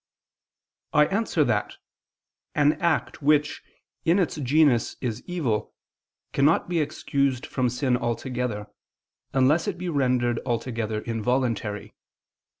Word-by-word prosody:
I 150 0 +6
answer 195 -4 +1
that, 115 -6 -1 0.8
An 150 0 +4
act 170 -2 0
which, 150 +1 +2 0.4
in 170 +3 +3
its 180 -5 0
genus, 140 -3 +3
is 115 -4 -3
evil, 130 - -2 0.6
cannot 145 +4 +3
be 175 -1 0
excused 140 -3 -1
from 130 -2 0
sin 125 +1 0
altogether, 120 -2 -3 0.7
unless 140 +8 +3
it 195 -4 -2
be 180 0 -4
rendered 125 -5 +1
altogether 115 -2 -2
involuntary. 115 -2 -2
130 Hz, 110 wpm, -25 LUFS, 120-150 Hz, 0.8 s, I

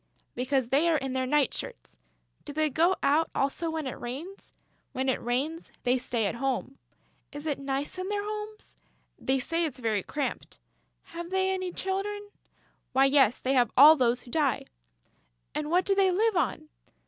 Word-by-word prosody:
"Because 255 0 0
they 295 +6 +3
are 320 - +3
in 270 -2 -3
their 260 -1 -1
night 290 -1 +2
shirts." - - -7 0.4
"Do - - -8
they 310 0 +1
go 335 +7 +3
out 310 +3 +3
also 280 +5 0
when 320 -2 -3
it 260 - -5
rains?" 300 +11 -7 0.4
"When 260 +1 -1
it 260 - +1
rains, 275 +8 -2
they 250 +1 +2
stay 235 -3 -1
at 200 - 0
home." 265 +1 -3 0.5
"Is 290 +1 -8
it 290 -3 -1
nice 275 +5 -3
in 370 +1 -3
their 410 0 -1
homes?" 425 0 -6 0.4
"They 265 +1 +1
say 330 +6 -1
it's 295 -5 -3
very 220 -5 0
cramped." 285 +7 -4 0.5
"Have 340 0 -8
they 380 0 +1
any 370 -1 -2
little 355 - -8
children?" 410 +2 -3 0.6
"Why, 265 +1 +5
yes, 270 -4 +4
they 265 - -1
have 245 -2 +4
all 300 +4 +10
those 245 -3 +2
who 240 - -14
die." 290 -4 +1 0.9
"And 300 0 -3
what 360 +3 +3
do 400 - +3
they 390 -1 +4
live 425 +4 +2
on?" 310 -1 -1
290 Hz, 185 wpm, -28 LUFS, 260-355 Hz, 0.9 s, all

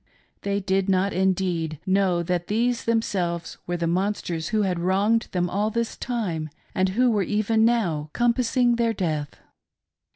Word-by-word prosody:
They 200 0 -1
did 195 0 0
not, 190 +1 +2
indeed, 180 -4 0
know 185 -2 +2
that 175 0 -2
these 235 +3 0
themselves 185 -7 -1
were 175 0 -1
the 170 - -1
monsters 175 -2 -1
who 215 -1 +1
had 180 -3 0
wronged 200 +6 +2
them 180 -1 0
all 205 +4 0
this 235 +1 -2
time 185 -11 -3 0.2
and 185 0 +1
who 245 +6 +3
were 210 -2 +1
even 215 +3 +1
now 175 -11 +1
compassing 240 - +2
their 230 -1 +1
death. 155 -7 -2
195 Hz, 155 wpm, -24 LUFS, 175-225 Hz, 0.2 s, who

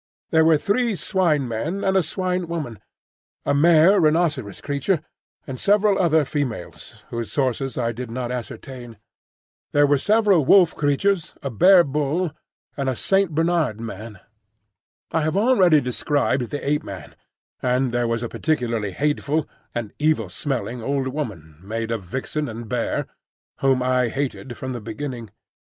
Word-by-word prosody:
There 160 -1 +5
were 160 -1 +5
three 220 +6 0
Swine 170 -8 +1
men 150 - -3
and 190 0 +1
a 190 - +5
Swine 180 +2 -2
woman, 150 - -4 0.7
a - - +2
mare 165 +6 +5
rhinoceros 155 - +1
creature, 145 +5 0 0.5
and 130 -3 -6
several 205 0 +3
other 160 -4 +3
females 130 - -5
whose 115 -3 -4
sources 135 -1 -1
I 115 -2 0
did 120 +1 -6
not 125 +1 -4
ascertain. 125 -1 -7 0.8
There 145 0 +5
were 145 -1 +3
several 205 -3 +3
wolf 175 +4 +5
creatures, 155 +5 0
a 140 - -3
bear 180 - +6
bull, 150 +4 -1 0.4
and 140 -2 -1
a 130 - -1
Saint 195 +2 +1
Bernard 165 -8 +1
man. 110 -2 -7 0.9
I 160 - +1
have 155 +4 0
already 195 -8 +5
described 130 0 0
the 145 - -5
Ape 150 +1 +1
man, 95 - -9 0.5
and 125 0 +1
there 120 0 0
was 115 +1 -1
a - - -1
particularly 115 - -1
hateful 150 - 0 0.3
(and 115 -4 -4
evil 150 - +1
smelling) 120 - -3
old 135 +2 -1
woman 95 - -6
made 115 +3 -4
of 115 -2 -2
vixen 135 - -4
and 115 +1 -7
bear, - - -1 0.5
whom 135 -2 +2
I 125 -1 +2
hated 135 -1 -4
from 130 0 -5
the 120 - -5
beginning. 115 +1 -6
140 Hz, 150 wpm, -22 LUFS, 120-160 Hz, 0.9 s, bear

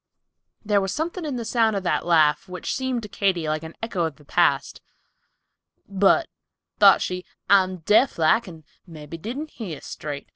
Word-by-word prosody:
There 205 -1 +2
was 195 -1 -2
something 335 +2 -3
in 290 -4 -3
the 235 -2 -4
sound 225 -2 +2
of 195 - -2
that 175 - -1
laugh, 160 +2 +3
which 180 0 -4
seemed 260 -3 -2
to - - -6
Katy 190 -5 -1
like 155 0 -1
an 160 0 -10
echo 190 -7 -1
of 160 -3 -4
the 150 - -20
past. 145 -4 +1 1.1
"But," 200 - +3 0.5
thought - - +7
she, 180 0 -4 0.2
"I'm 185 -2 +3
deaf 240 +5 +3
like 185 +8 +3
and 165 -3 -11 0.2
mebby 160 0 -10
didn't 265 - -6
hear 180 - -7
straight. 145 -2 -7
185 Hz, 175 wpm, -23 LUFS, 160-225 Hz, 1.1 s, thought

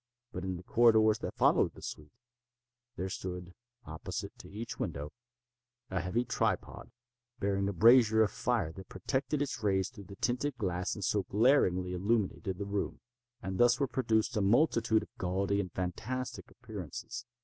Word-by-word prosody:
But 90 - -5
in 95 -1 -2
the 90 - -10
corridors 110 0 +5
that - - -5
followed - - +3
the - - -12
suite, 75 -1 -7 0.8
there 95 - -3
stood, 90 -1 -6 0.3
opposite 80 0 -6
to - - -11
each 110 +3 -6
window, 75 +1 -4 0.8
a 95 - 0
heavy 115 +7 0
tripod, 115 -5 -1 0.5
bearing 100 0 0
a - - -2
brazier 110 +2 +6
of 105 - 0
fire 120 -10 0
that 95 +1 -11
projected 135 - -1
its 135 -4 -4
rays 95 -3 +1
through 100 -5 -11
the 100 - -10
tinted 125 +7 -1
glass 90 -3 -1
and 105 - -6
so 105 - +2
glaringly 95 -6 +3
illumined 100 +2 0
the 95 0 -3
room. 100 0 -2 0.4
And 95 0 -3
thus 120 0 +5
were 140 - +3
produced 115 -2 +1
a 105 - +2
multitude 110 0 +3
of - - -16
gaudy 95 +2 0
and 95 -3 -3
fantastic 110 +9 -4
appearances. 110 - -7
105 Hz, 160 wpm, -32 LUFS, 95-120 Hz, 0.8 s, brazier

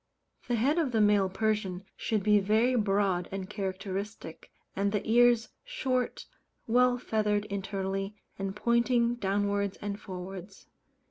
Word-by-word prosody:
The 240 - +1
head 275 +9 +2
of 280 -7 0
the 220 - +3
male 205 -2 +4
Persian 195 -2 -1
should 215 -3 -1
be 210 0 +5
very 220 +5 +2
broad 195 -5 +1
and 190 -1 -4
characteristic; 195 -2 -5 0.3
and 200 +1 +1
the 210 -1 -2
ears 240 0 +4
short, 260 - -2 0.4
well 245 +2 +3
feathered 210 -3 0
internally, 195 0 -3 0.2
and 195 0 -3
pointing 235 +1 +2
downwards 200 -2 -1
and 205 0 -4
forwards. 185 +1 -8
205 Hz, 130 wpm, -29 LUFS, 195-235 Hz, 0.4 s, be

